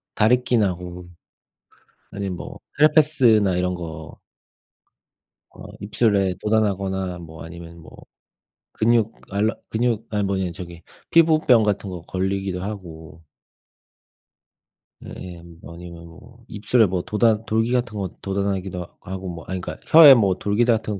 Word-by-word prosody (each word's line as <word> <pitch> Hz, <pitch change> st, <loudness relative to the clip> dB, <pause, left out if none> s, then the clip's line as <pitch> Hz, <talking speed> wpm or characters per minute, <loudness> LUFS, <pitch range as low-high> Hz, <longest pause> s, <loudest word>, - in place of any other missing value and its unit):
다래끼 125 Hz, +3 st, +2 dB
나고 90 Hz, -3 st, -3 dB, 1.0 s
아니면 100 Hz, -3 st, -4 dB
뭐 -, -, -9 dB, 0.2 s
헤르페스나 135 Hz, -, +4 dB
이런 90 Hz, 0 st, -1 dB
거 80 Hz, -2 st, -8 dB, 1.3 s
어 -, -, -14 dB, 0.2 s
입술에 100 Hz, -2 st, +1 dB
돋아나거나 95 Hz, -4 st, -1 dB
뭐 80 Hz, -2 st, -11 dB
아니면 85 Hz, 0 st, -11 dB
뭐 80 Hz, -, -15 dB, 0.8 s
근육 115 Hz, -1 st, +1 dB, 0.2 s
알러 105 Hz, +3 st, 0 dB
근육 115 Hz, -1 st, -1 dB
아니 105 Hz, -1 st, -1 dB
뭐냐 95 Hz, -2 st, -1 dB
저기 85 Hz, -1 st, -10 dB, 0.3 s
피부병 155 Hz, -8 st, +4 dB
같은 105 Hz, -1 st, -1 dB
거 90 Hz, -2 st, -7 dB
걸리기도 95 Hz, 0 st, -3 dB
하고 85 Hz, -6 st, -9 dB, 1.8 s
예예. 90 Hz, -2 st, -9 dB, 0.3 s
아니면 85 Hz, 0 st, -11 dB
뭐 120 Hz, +8 st, -17 dB
입술에 110 Hz, +3 st, +2 dB
뭐 90 Hz, -2 st, -2 dB
돋아 110 Hz, +2 st, +1 dB
돌기 115 Hz, +2 st, 0 dB
같은 120 Hz, -3 st, -1 dB
거 95 Hz, -2 st, -3 dB
돋아나기도 95 Hz, -2 st, -3 dB
하고 95 Hz, +1 st, -7 dB
뭐 85 Hz, -2 st, -8 dB
아니 95 Hz, 0 st, -4 dB
그러니까 -, -, -8 dB
혀에 155 Hz, -3 st, +10 dB
뭐 100 Hz, -7 st, +2 dB
돌기 105 Hz, +5 st, 0 dB
같은 110 Hz, -4 st, 0 dB
100 Hz, 265 characters per minute, -22 LUFS, 90-110 Hz, 1.8 s, 혀에